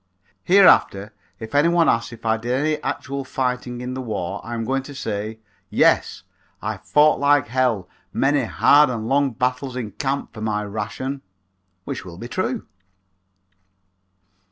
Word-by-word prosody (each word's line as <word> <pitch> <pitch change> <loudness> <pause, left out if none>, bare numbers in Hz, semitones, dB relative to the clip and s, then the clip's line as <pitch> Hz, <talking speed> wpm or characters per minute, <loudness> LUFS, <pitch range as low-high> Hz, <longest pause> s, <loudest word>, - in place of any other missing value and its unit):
Hereafter 110 - +4 0.3
if 110 +2 -8
any 145 +3 +4
one 170 -1 +3
asks 115 0 +1
if 115 -1 -12
I 110 0 +3
did 120 +2 -3
any 150 +4 0
actual 140 +1 -4
fighting 125 -2 -3
in 125 +1 -4
this 130 - -4
war 100 -4 -4
I 120 - -5
am 115 -1 -3
going 135 +3 0
to 140 +1 -11
say, 110 -3 -4 0.3
"Yes, - - +2 0.4
I 110 0 -4
fought 150 +9 +3
like 145 -3 +3
hell 120 -7 0 0.2
many 135 +2 +1
hard 145 +5 +5
and 115 -3 -3
long 140 +2 +2
battles 125 +1 -2
in 115 -5 -4
camp 140 0 -3
for 110 - -9
my 105 -1 -1
ration," 110 +7 -4 0.6
which - - -5
will 85 -2 -10
be 120 - -7
true. 210 - -2
125 Hz, 155 wpm, -22 LUFS, 110-140 Hz, 0.6 s, hard